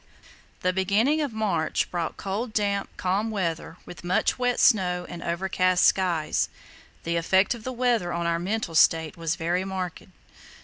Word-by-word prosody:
The 185 0 +1
beginning 210 +11 +2
of 290 -4 -2
March 200 -8 -1
brought 170 -2 -3
cold, 210 +4 -4
damp, 200 -2 0
calm 195 +4 0
weather, 170 -5 -3
with 175 - -11
much 180 +7 +1
wet 245 -1 +1
snow 180 -6 +3
and 175 - -8
overcast 185 +1 +1
skies. 170 -5 +1 0.5
The 170 0 -1
effect 190 +5 +3
of 235 -2 -10
the 255 - -4
weather 240 -7 0
on 170 0 -2
our 170 0 +1
mental 190 -1 -2
state 160 -1 +3
was 165 -1 -2
very 175 +2 -1
marked. 190 -3 -4
185 Hz, 160 wpm, -26 LUFS, 170-215 Hz, 0.5 s, snow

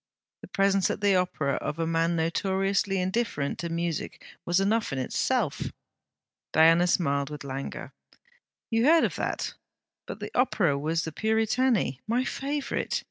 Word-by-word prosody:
The - - -10
presence 195 -1 +2
at - - -3
the 200 -1 +4
Opera 165 -6 0
of 150 - -4
a 165 - 0
man 165 +1 +1
notoriously 195 +4 0
indifferent 185 -6 -1
to 170 - -3
music 170 -1 -3 0.2
was 175 +2 +3
enough 215 +3 +1
in 135 - -3
itself.' 130 - -1 0.8
Diana 165 +2 +5
smiled 140 -6 +1
with 150 -1 -7
languor. 135 0 -6 0.8
'You 225 +1 +2
heard 325 +2 +6
of - - 0
that? - - -2 0.5
But - - -6
the - - -6
Opera 205 - +2
was 160 +4 -1
The 160 - -4
Puritani, 220 - +1
my 240 +3 +1
favourite. 280 +1 -2
180 Hz, 145 wpm, -27 LUFS, 160-220 Hz, 0.8 s, heard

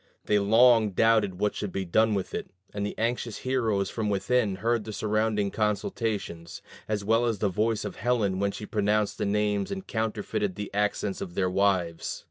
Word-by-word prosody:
They 105 - +3
long 110 0 +5
doubted 110 -3 +3
what 105 0 +1
should 105 - -4
be 95 0 -3
done 110 +5 +3
with 95 - -3
it; - - -4 0.2
and 100 -1 -3
the 105 - -4
anxious 115 -1 -1
heroes 110 -7 0
from 110 -2 -2
within 105 +1 +1
heard 115 +3 0
the 110 0 -7
surrounding 105 -1 0
consultations, 105 -5 -2 0.2
as 105 -2 -2
well 115 +3 +3
as 115 -2 0
the 100 +1 +1
voice 105 +3 0
of 100 - -6
Helen 110 -5 0
when 100 0 +1
she 105 - -7
pronounced 105 -1 0
their - - 0
names 105 -1 0
and 195 -1 -5
counterfeited 105 -3 -2
the 105 -1 -6
accents 105 -1 -1
of 85 -1 -6
their 95 -2 +1
wives. 95 -4 0
105 Hz, 185 wpm, -27 LUFS, 100-110 Hz, 0.2 s, long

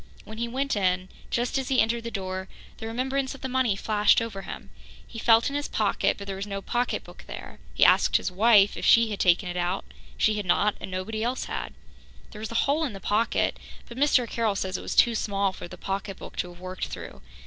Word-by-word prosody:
When 220 +1 -9
he 235 - -1
went 270 +3 -1
in, 185 -2 0 0.2
just 245 +3 0
as 265 - -4
he 265 - +3
entered 230 +1 +2
the 230 - -4
door, 190 -3 -4 0.3
the 225 - -5
remembrance 265 +4 -1
of 275 - -14
the 265 - -2
money 255 -5 +1
flashed 210 +1 +3
over 225 -4 -4
him. - - -9 0.3
He 225 - -9
felt 225 0 +5
in 280 - -3
his 290 0 -1
pocket, 210 -2 +1
but 200 - -8
there 195 -1 -4
was 195 +2 -5
no 200 -1 -3
pocketbook 240 +5 -3
there; - - -9 0.2
he - - +5
asked - - +5
his - - -3
wife 205 +1 +5
if - - -6
she 230 -1 +5
had 205 - -4
taken 180 +1 +3
it 180 0 -4
out. 180 +2 -1 0.3
She 215 -1 +2
had 205 - -3
not, 205 +4 +3
and - - -5
nobody 200 +4 -3
else 245 +2 -1
had. - - -5 0.6
There 210 - -10
was 220 - -5
a - - -6
hole 295 +3 +1
in 270 -8 -2
the 195 - -8
pocket, 210 +4 +1 0.3
but 235 - -10
Mr. 265 -2 +3
Carroll 225 -3 0
says 190 -1 -2
it - - -3
was - - -4
too 235 - +5
small 200 -3 0
for - - -8
the - - -11
pocketbook 195 0 -5
to 180 - -2
have 175 0 -14
worked 185 0 -5
through. - - -8
215 Hz, 235 wpm, -26 LUFS, 195-235 Hz, 0.6 s, felt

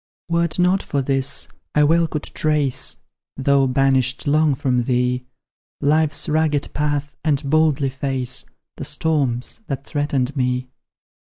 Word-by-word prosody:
Were 170 0 +2
't 155 - -2
not 185 +2 +3
for 140 -2 -2
this, 135 0 +2 0.3
I 150 - +5
well 165 +3 +3
could 150 -1 -4
trace 150 -4 0 0.3
(Though 135 0 +3
banished 130 -1 +1
long 150 0 +3
from 125 -4 0
thee) 125 0 0 0.5
Life's 150 0 +1
rugged 155 -2 0
path, 145 -1 -1
and 145 -2 0
boldly 150 -2 +2
face 130 -1 -2 0.3
The - - -5
storms 140 - -1
that 135 -3 -4
threaten 145 -3 0
me. 125 -1 -1
140 Hz, 135 wpm, -21 LUFS, 130-150 Hz, 0.5 s, I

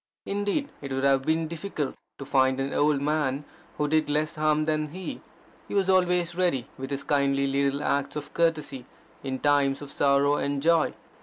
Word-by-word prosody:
Indeed 205 +8 -1
it 140 -1 -6
would 135 0 -1
have 135 -1 +4
been 160 +3 0
difficult 160 -3 -4 0.2
to 140 - -7
find 130 -1 +2
an 135 +1 -2
old 145 -1 +2
man 145 -2 0 0.3
who 150 - +1
did 155 0 +1
less 155 +2 0
harm 155 0 +2
than 155 -1 0
he. 180 +5 -7 0.5
He - - -5
was 190 -1 +3
always 180 -2 +2
ready 170 -8 0
with 135 0 -6
his 140 -1 -3
kindly 140 -1 +2
little 140 +1 0
acts 140 0 0
of 150 -1 -6
courtesy 155 -6 0 0.4
in 130 -1 -3
times 140 -1 +2
of 145 -1 -9
sorrow 140 +1 +3
and 140 0 -1
joy. 165 +2 +2
145 Hz, 180 wpm, -26 LUFS, 140-160 Hz, 0.5 s, have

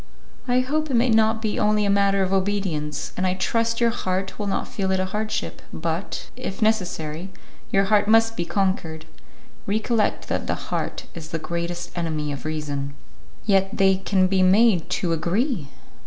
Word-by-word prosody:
"I 250 0 +3
hope 305 +4 -1
it 265 - +1
may 235 +1 +4
not 220 0 +3
be 215 - -1
only 210 0 +3
a - - +1
matter 200 -1 +3
of 190 +1 -1
obedience, 190 -7 -1
and 185 - 0
I 185 - +1
trust 230 +4 0
your 235 -1 +3
heart 190 -2 -2
will 205 - -2
not 195 - -1
feel 195 -2 -2
it 190 - +2
a 185 - +1
hardship, 215 +3 -3
but, 165 +3 -3
if 250 -6 -5
necessary, 180 -6 0 0.4
your 195 - +4
heart 205 0 +3
must 225 +1 +4
be 175 - -1
conquered. 170 -4 -1 0.6
Recollect 215 +1 0
that - - -2
the - - 0
heart - - -4
is 165 -2 -8
the 165 - -2
greatest 170 +1 -4
enemy 155 -4 -2
of 140 -1 -6
reason." 145 -3 -3 0.5
"Yet 195 -2 +2
they 190 -1 +5
can 190 0 +2
be 190 0 +2
made 190 -1 +4
to 170 -3 0
agree." 175 - 0
195 Hz, 175 wpm, -24 LUFS, 170-220 Hz, 0.6 s, they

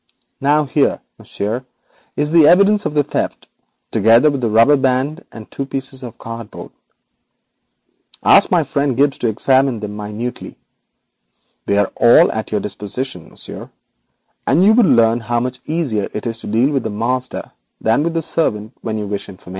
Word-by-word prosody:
Now 145 +2 +2
here, 140 +1 +1 0.2
Monsieur, 110 +5 -4 0.5
is 150 +1 -1
the 160 -3 +6
evidence 200 +4 +4
of 150 - -7
the 145 - +3
theft, - - -4 0.4
together 115 +8 +4
with 140 -2 -3
the 115 - 0
rubber 115 +7 +5
band 135 +5 -1
and 110 -2 -10
two 135 - -5
pieces 135 -1 -5
of 120 -3 -9
cardboard. 115 -1 -9 1.5
Ask - - +5
my - - +3
friend 140 -3 -1
Gibbes 140 +1 +2
to 120 - 0
examine 130 +2 +2
them 105 -1 -6
minutely. 105 +4 -6 1.1
They 100 - +1
are 100 -1 +1
all 120 - +5
at 110 0 -5
your 105 - 0
disposition, 105 -2 -4
Monsieur, - - -9 0.8
and 150 +6 +3
thus - - +5
you 215 - +6
learn 120 - +4
how 120 +1 -1
much 125 +1 -4
easier 145 -11 -1
it 105 - -4
is 115 -1 -4
to - - -9
deal 115 +7 +2
with 135 -2 0
the - - -3
master 125 +4 -3 0.3
than 110 +5 +1
with 165 +1 -2
the 165 - -1
servant. 110 -9 -1
125 Hz, 160 wpm, -17 LUFS, 110-145 Hz, 1.5 s, the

